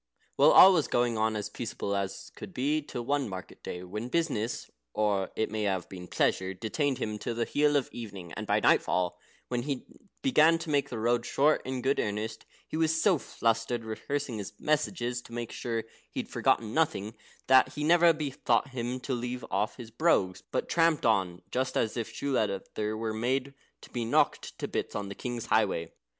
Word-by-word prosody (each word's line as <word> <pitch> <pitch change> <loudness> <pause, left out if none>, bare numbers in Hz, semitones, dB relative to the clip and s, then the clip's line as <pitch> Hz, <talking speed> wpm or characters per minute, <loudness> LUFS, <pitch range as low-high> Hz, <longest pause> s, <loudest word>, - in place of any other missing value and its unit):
Well, - - +6
all 190 +1 +9
was 160 -5 +2
going 120 -1 +1
on 110 0 +1
as 105 - -2
peaceable 100 -4 -4
as 100 0 -4
could 190 - -9
be, 150 +4 +1
till 120 -4 -6
one 140 -2 0
market 95 -1 -8
day, 90 - -6
when 105 +6 -5
business 125 -8 -1 0.2
(or 100 -3 +1
it 110 - -1
may 110 - -2
have 95 -3 -1
been 90 -2 -8
pleasure) 95 +1 0
detained 130 - -1
him 105 -1 -3
till 115 - -3
the 115 0 0
heel 150 0 +2
of 140 -3 +2
the - - -8
evening, 95 -6 -8
and - - -5
by - - +3
nightfall, 90 -1 +2 0.3
when 120 -1 0
he 135 0 -3 0.4
began 165 - +5
to 165 -1 -5
make 140 -1 +2
the 120 - -4
road 120 +2 +1
short 145 +5 +3
in 130 -1 -3
good 135 +2 +2
earnest, 110 +2 -3 0.2
he - - -6
was 160 0 +2
so 180 -3 +4
flustered, 115 0 -1
rehearsing 125 +2 -3
his 100 - -6
messages 150 -5 0
to 115 - -14
make 120 -1 -4
sure 115 -2 -3 0.3
he'd - - -5
forgotten 110 -1 +1
nothing, 145 -10 0 0.3
that 130 0 +5
he 150 - -3
never 170 +2 +6
bethought 145 -2 0
him 125 0 -3
to 130 - -3
leave 125 0 -3
off 105 +3 0
his 115 -3 -9
brogues, 115 - +2
but - - -1
tramped 165 -2 +2
on 95 -6 +1
just 130 +1 -1
as 110 - 0
if 115 -2 -3
shoe 140 - -3
leather 105 0 -1
were 110 0 -2
made 130 +5 -1 0.3
to - - -14
be 120 - -2
knocked 115 - +1
to - - -3
bits - - -3
on 100 -1 -3
the - - -5
king's 120 +1 -4
highway. 95 -7 +1
120 Hz, 195 wpm, -29 LUFS, 105-140 Hz, 0.4 s, all